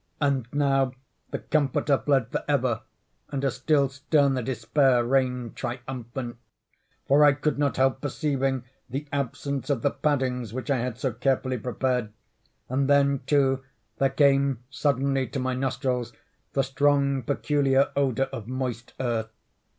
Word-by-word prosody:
And 140 -5 +1
now 135 -3 +2 0.4
the - - -2
Comforter 140 -1 +1
fled 135 -5 +2
for - - -2
ever, - - +1 0.5
and 140 -1 -3
a 135 - +2
still 140 +3 +2
sterner 140 -1 +1
Despair 125 +1 +2
reigned 125 -2 0
triumphant; 120 -1 -5 0.7
for 145 +2 +5
I 145 -1 +7
could 145 +1 -1
not 145 -2 +1
help 135 0 +2
perceiving 135 -3 -1 0.3
the 135 +4 -4
absence 140 0 -2
of 135 -6 0
the - - +3
paddings 130 -6 -1
which 130 +1 -3
I 135 - +3
had 125 -1 -3
so 130 -4 -1
carefully 130 -1 0
prepared—and 125 +2 -3
then, 140 -1 +4
too, 135 -2 +2 0.4
there 135 - +3
came 140 -3 +3
suddenly 135 -2 +1
to - - -5
my 130 0 -1
nostrils 125 -2 -1 0.4
the 135 - +2
strong 140 0 +2
peculiar 140 +1 +2
odor 135 -2 +1
of 110 -2 -6
moist 125 -2 -4
earth. 115 -3 -1
135 Hz, 140 wpm, -26 LUFS, 125-140 Hz, 0.7 s, I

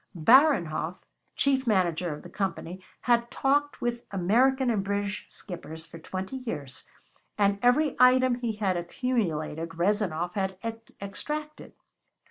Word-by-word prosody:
Baranhov, 180 - +4 0.4
chief 270 -2 +2
manager 180 -5 +1
of 150 - -7
the 175 - -10
Company, 185 -1 -4 0.2
had 235 -1 +2
talked 290 +2 0
with 240 0 -2
American 245 +8 +2
and 205 -4 0
British 200 +1 -3
skippers 160 -4 -8
for 165 0 -11
twenty 190 +9 -5
years, 145 - -6 0.5
and 200 -1 +2
every 265 +4 +3
item 255 0 +6
he 240 -2 -2
had 200 -4 0
accumulated 170 -5 -2
Rezanov 175 -2 0
had 190 -2 -2 0.4
extracted. 300 +10 -5
200 Hz, 120 wpm, -27 LUFS, 175-250 Hz, 0.5 s, item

